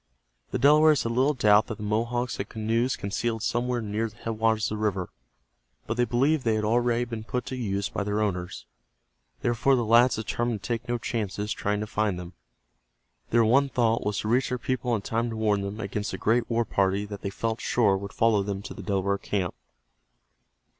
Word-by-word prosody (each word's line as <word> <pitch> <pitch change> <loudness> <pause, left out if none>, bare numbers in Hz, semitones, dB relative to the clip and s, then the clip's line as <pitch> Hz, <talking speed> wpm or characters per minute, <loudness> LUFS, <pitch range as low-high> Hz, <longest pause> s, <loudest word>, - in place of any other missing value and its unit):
The - - -2
Delawares 150 +1 +5
had 115 - -2
little 130 +5 +2
doubt 105 -2 +4
that 110 - -5
the - - -7
Mohawks 115 +4 -1
had 100 - -4
canoes 115 +3 0
concealed 110 +2 -2
somewhere 120 +1 0
near 110 +2 -2
the 105 - -21
headwaters 110 -1 0
of 105 - -3
the - - -2
river, 95 -4 -1 0.7
but 110 - -2
they 120 +1 +2
believed 135 +5 +1
they 115 -2 +2
had 110 - -1
already 120 +2 +2
been 115 -2 -6
put 125 +3 -3
to 130 - -5
use 100 -5 -2
by - - -3
their 105 +1 -1
owners. 90 - -2 0.8
Therefore, 120 +3 +3
the 120 -2 0
lads 120 +3 +5
determined 115 0 -2
to - - -5
take 120 0 -3
no 120 - +1
chances 105 -3 -3
trying 105 +1 -1
to - - -2
find 105 -3 -1
them. 90 0 -8 1.0
Their 115 -1 +4
one 135 +5 +4
thought 115 -3 +1
was 105 -1 -1
to - - -4
reach 125 +4 +2
their 125 - -1
people 125 -1 -1
in 100 - -4
time 115 +3 -1
to 115 - -5
warn 105 -2 +1
them 100 +2 -5
against 105 0 -3
the - - -4
great 115 +2 +1
war 115 0 +1
party 100 0 +1
that 100 -1 -8
they 100 - -3
felt 115 +3 -3
sure 105 -5 +2
would 100 +1 -5
follow 110 -3 +3
them 100 0 -4
to - - -7
the - - -9
Delaware 100 -1 0
camp. 95 -4 -2
110 Hz, 210 wpm, -26 LUFS, 105-120 Hz, 1.0 s, Delawares